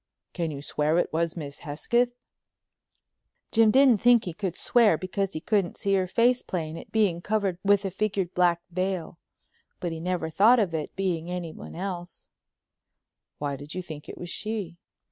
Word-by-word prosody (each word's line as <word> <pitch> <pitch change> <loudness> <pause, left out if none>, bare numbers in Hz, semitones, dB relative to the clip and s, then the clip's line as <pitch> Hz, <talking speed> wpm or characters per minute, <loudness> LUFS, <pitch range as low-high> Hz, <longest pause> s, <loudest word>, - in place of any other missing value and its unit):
"Can 170 -3 -2
you 140 -2 -6
swear 150 +2 +1
it 175 - 0
was 165 +1 0
Miss 145 -3 -6
Hesketh?" 235 +11 +1 1.4
Jim 225 -1 +5
didn't 255 -2 +5
think 240 -1 +5
he 175 - -4
could 185 -1 -3
swear 230 - +4
because 195 +2 -2
he 155 - -3
couldn't 195 0 0
see 200 - 0
her 190 -1 +2
face 240 +6 +3
plain, 160 -3 -4
it - - -10
being 200 -6 +2
covered 200 -3 -1
with 200 0 +3
a 195 - -2
figured 195 -2 -1
black 175 -1 +3
veil. 185 -1 -2 0.6
But 175 - -3
he 165 - -5
never 175 -1 -2
thought 220 +9 +6
of 200 -7 +1
it 155 -2 -4
being 175 -3 -1
anyone 175 -3 -6
else. 180 -1 -6 1.1
"Why 145 -1 -2
did 145 +4 -9
you 185 - -3
think 155 -3 -9
it - - -8
was 175 -1 -7
she?" 210 -6 -4
180 Hz, 175 wpm, -27 LUFS, 165-205 Hz, 1.4 s, thought